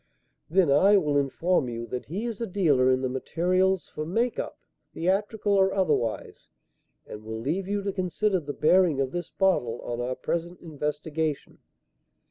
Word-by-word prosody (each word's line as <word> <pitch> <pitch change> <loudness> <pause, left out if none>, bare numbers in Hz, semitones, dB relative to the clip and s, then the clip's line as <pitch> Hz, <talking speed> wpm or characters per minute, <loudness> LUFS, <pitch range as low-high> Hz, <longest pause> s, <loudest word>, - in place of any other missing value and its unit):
"Then 175 -3 +3
I 195 +9 +6
will 150 -6 +1
inform 145 +1 +1
you 115 0 -5
that 125 +1 -5
he 195 +9 -4
is 230 -2 -5
a 230 - -1
dealer 150 -10 +3
in 130 0 +2
the - - +1
materials 180 +8 0
for 155 - -5
'make 225 +9 -1
up,' - - -5 0.4
theatrical 205 +4 0
or 195 -1 +4
otherwise, 155 - -1 0.6
and 105 - -9
will 110 +1 -5
leave 165 +11 -2
you 200 0 -1
to 200 -1 -2
consider 190 +1 0
the 145 -3 -6
bearing 160 0 +3
of 135 -1 0
this 175 -1 -4
bottle 125 -12 +1
on 120 0 -4
our 125 +1 -2
present 170 +4 -3
investigation. 150 -1 -3
170 Hz, 165 wpm, -26 LUFS, 135-190 Hz, 0.6 s, I